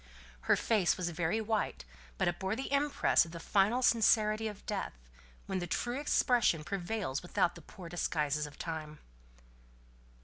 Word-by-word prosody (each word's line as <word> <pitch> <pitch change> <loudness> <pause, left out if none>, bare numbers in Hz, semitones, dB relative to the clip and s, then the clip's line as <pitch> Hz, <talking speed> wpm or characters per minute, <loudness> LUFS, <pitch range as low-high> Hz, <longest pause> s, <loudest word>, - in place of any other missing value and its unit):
Her - - +7
face 210 -6 +2
was 175 -2 -2
very 165 +5 0
white, 215 - -2 0.3
but - - +1
it 175 0 -1
bore 190 +2 -1
the 265 +3 -5
impress 285 0 +3
of 165 0 -10
the 170 - -6
final 205 +8 +2
sincerity 220 -2 +3
of 210 -2 -8
death, 205 -2 -3 0.5
when 190 - -2
the 175 - -4
true 240 +9 -2
expression 240 - +2
prevails 185 -4 -3
without 180 0 +1
the 170 - -12
poor 175 +3 -11
disguises 150 -3 -1
of 145 - -14
time. 155 -2 -5
190 Hz, 160 wpm, -32 LUFS, 165-220 Hz, 0.5 s, Her